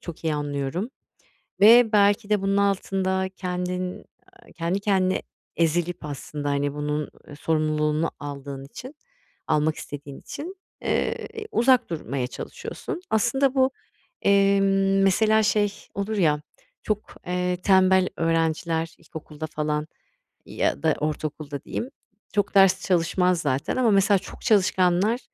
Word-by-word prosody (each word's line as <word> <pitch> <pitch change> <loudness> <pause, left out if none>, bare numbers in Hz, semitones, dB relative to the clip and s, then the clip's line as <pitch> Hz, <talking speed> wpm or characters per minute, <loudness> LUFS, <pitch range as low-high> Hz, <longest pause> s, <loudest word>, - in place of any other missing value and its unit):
çok 170 -1 -9
iyi 155 -2 +1
anlıyorum 145 - -3 0.7
ve 225 +2 +7
belki 205 0 +3
de 210 -2 +2
bunun 195 0 +1
altında 190 -1 0
kendin, 180 0 -3 0.3
aaa, - - -20
kendi 170 +3 -1
kendine 190 -2 +1 0.3
ezilip 170 +1 0
aslında, 145 0 -5
hani, 140 0 0
bunun, 150 0 -2 0.2
ııı, 145 - -10
sorumluluğunu 155 0 0
aldığın 140 -1 -7
için, 255 - -10 0.5
almak 150 +1 +2
istediğin 145 -1 -8
için, 350 +6 -7 0.3
eee, - - -1 0.2
uzak 255 - +3
durmaya 140 -6 -3
çalışıyorsun. 345 - -7
Aslında 250 +5 +2
bu, 260 0 +3 0.5
emm, 195 -1 +3
mesela, 220 +3 +4
şey 210 -1 +2 0.2
olur 205 +2 -3
ya, 150 -5 +2 0.4
çok, 215 0 -3
eee, 180 0 -1
tembel 190 -1 +5
öğrenciler 165 0 0
ilkokulda 155 -1 -8
falan 150 0 -2 0.6
ya - - -1
da 160 -1 +3
ortaokulda, 150 -1 -4
diyeyim, 245 - -4 0.4
çok 205 -1 0
ders 195 0 +5
çalışmaz 180 0 +2
zaten 140 - -1
ama 250 -3 +3
mesela 200 0 +4
çok 195 - -12
çalışkanlar 195 +1 +3
180 Hz, 125 wpm, -24 LUFS, 155-200 Hz, 0.7 s, ve